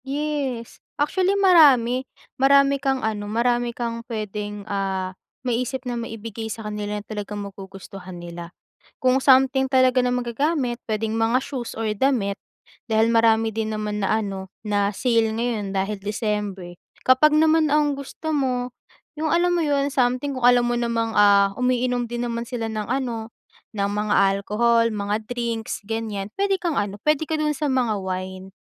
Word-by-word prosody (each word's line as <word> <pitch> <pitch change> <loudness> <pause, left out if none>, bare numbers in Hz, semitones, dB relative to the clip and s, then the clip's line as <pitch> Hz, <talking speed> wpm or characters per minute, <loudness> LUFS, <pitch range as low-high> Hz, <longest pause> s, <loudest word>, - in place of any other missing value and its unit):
Yes. 275 -4 -3 0.2
Actually 370 +7 +1
marami 275 -10 +5 0.4
marami 275 0 +5
kang 270 -3 0
ano, 205 -2 -3
marami 240 +2 +1
kang 230 -1 -4
puwedeng, 210 -2 -5
ah, 190 -2 -2 0.3
maisip 255 +2 -2
na - - -2
maibigay 225 -1 -6
sa 220 0 -6
kanila 210 0 -4
na - - -21
talagang 210 -1 -5
magugustuhan 195 -1 -10
nila. 170 0 -8 0.5
Kung 255 +1 +3
something 265 0 +5
talaga 255 -1 +4
na 250 - +1
magagamit, 250 +1 -1
puwedeng 220 0 -2
mga 225 +2 +2
shoes 265 -3 -5
or 225 0 -2
damit, 210 -5 +1 0.5
dahil 220 0 +3
marami 225 -1 +3
din 220 -1 -1
naman 210 -1 -3
na 220 +2 +2
ano, 195 -2 -5 0.2
na 205 -1 +1
sale 230 0 +1
ngayon 220 -3 -2
dahil 195 +2 -1
December. 205 -3 -3 0.3
Kapag 260 +4 +5
naman 315 0 +4
ang 300 -1 +3
gusto 280 +3 -5
mo, 250 -3 0 0.5
'yung 315 +1 -1
alam 350 +1 +3
mo 350 - +1
'yun, 285 -1 +1
something 255 +2 +1
kung 255 - -4
alam 245 0 +6
mo 240 - 0
namang, 230 -1 -1
ah, 200 -1 +5
umiinom 250 -1 +1
din 240 +1 -3
naman 235 0 -3
sila 235 -3 -3
ng 215 -1 -4
ano, 235 -3 -3 0.4
ng 200 -2 -1
mga 210 +1 -1 0.2
alcohol, 230 +3 +2
mga 210 +1 -2
drinks 235 -1 -3
ganiyan, 220 -3 -3
puwede 395 -1 +1
kang 335 -5 -1
ano, 200 0 -2
puwede 305 +4 +1
ka 315 -1 -2
dun 300 -1 0
sa 290 -1 -1
mga 245 -5 +1
wine, 185 0 -5
230 Hz, 160 wpm, -23 LUFS, 210-265 Hz, 0.5 s, alam